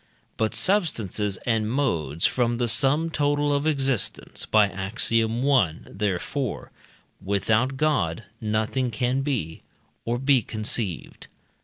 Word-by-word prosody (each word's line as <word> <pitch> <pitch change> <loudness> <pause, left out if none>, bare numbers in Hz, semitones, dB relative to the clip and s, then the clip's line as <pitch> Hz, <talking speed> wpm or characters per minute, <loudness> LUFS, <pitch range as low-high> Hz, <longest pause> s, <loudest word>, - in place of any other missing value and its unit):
But 110 -1 -1
substances 110 - +1
and 110 -3 +1
modes 85 - 0
form 120 -2 +1
the 120 0 0
sum 145 +7 +2
total 145 -1 +1
of 145 +2 0
existence 135 -6 -1
(by 105 -1 +5
Ax. 95 +4 -4
i.), 115 0 +4 0.6
therefore, 105 +6 -3 0.5
without 110 +7 +1
God 115 - 0 0.2
nothing 110 +4 0
can 125 +4 0
be, 120 - -3 0.4
or 120 +1 -1
be 135 0 +3
conceived. 110 -4 -3
115 Hz, 115 wpm, -25 LUFS, 105-135 Hz, 0.6 s, by